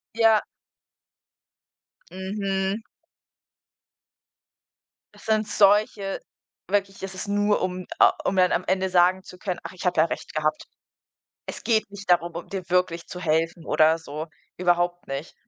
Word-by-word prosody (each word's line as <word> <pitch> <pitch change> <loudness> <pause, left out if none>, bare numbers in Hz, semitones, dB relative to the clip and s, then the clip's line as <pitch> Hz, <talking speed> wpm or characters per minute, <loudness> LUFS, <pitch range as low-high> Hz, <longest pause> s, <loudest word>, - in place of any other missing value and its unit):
Ja. 225 -2 +5 1.7
Mhm. 195 +2 -2 2.3
Es - - -17
sind 215 -1 +1
solche 205 -1 +3 0.5
wirklich 195 -1 -1
es 190 0 -5
ist 190 +2 -6
nur, 205 +1 +2
um 185 0 -3
a - - +7
um 190 - 0
dann 180 -1 +4
am 180 - +1
Ende 190 0 +1
sagen 185 +1 +3
zu 180 - -12
können: 185 -2 -4
„Ach, - - -7
ich 180 - -9
habe 175 -3 +2
ja 160 - +6
Recht - - -6
gehabt.“ 155 0 -1 0.8
Es - - -7
geht 220 -3 +1
nicht 200 -2 -10
darum, 175 -1 +3
um 170 - -7
dir 190 -2 -5
wirklich 180 -2 +1
zu 180 - -7
helfen 165 0 0
oder 160 +1 +4
so. 155 +1 -6 0.3
Überhaupt 175 0 +1
nicht. 135 +4 -5
185 Hz, 145 wpm, -25 LUFS, 175-200 Hz, 2.3 s, a